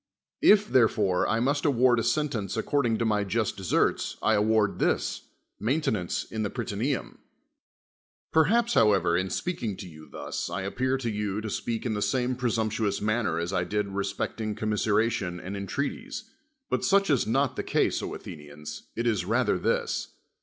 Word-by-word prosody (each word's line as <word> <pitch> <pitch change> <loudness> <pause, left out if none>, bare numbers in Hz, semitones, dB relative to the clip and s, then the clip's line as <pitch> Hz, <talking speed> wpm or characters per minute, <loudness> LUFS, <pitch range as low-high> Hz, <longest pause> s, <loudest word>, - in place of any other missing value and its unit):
If, 210 0 +6
therefore, 105 - +3
I 110 - +1
must 140 +4 +1
award 125 -4 +4
a - - +1
s 120 - +2
nlenee 120 -10 -2
according 120 -1 +1
to 115 - 0
my 105 -2 +2
just 105 +2 -1
deserts, 95 -3 0
I 110 - +4
award 105 0 +2
this. - - 0 0.3
I! - - -6
aintonance 110 - 0
in 110 - -2
the 105 - 0
Prytaneum. 120 +4 -3 1.1
i^M■l;a])s, 230 +10 +3
however, 95 -5 +4
in 95 +2 +1
spealdng 110 - -3
to 95 - -7
you 80 -2 -13
thus, - - -4
I 95 - -3
appear 130 +7 0
to 120 -3 -2
you 105 -1 -2
to 110 -1 -4
speak 115 +3 -3
in 115 - 0
the 105 - -2
same 125 +2 +1
presumptuous 110 -4 0
man;]in' 110 -5 0
as 85 +3 -3
I 90 - +1
did 105 +2 -1
respecting 100 +2 -3
commiseration 105 -3 0
and 95 +3 -6
entrcati''s: 100 - -4 0.5
])ut - - 0
such 195 -3 +3
is 135 - +3
n(^t 135 +4 +1
the - - -1
case, - - +1
O - - -4
Athe - - -8
nians, 75 0 -9
it 115 - -2
is 110 -6 +1
rather 110 -1 +1
this. - - 0
110 Hz, 175 wpm, -27 LUFS, 100-125 Hz, 1.1 s, If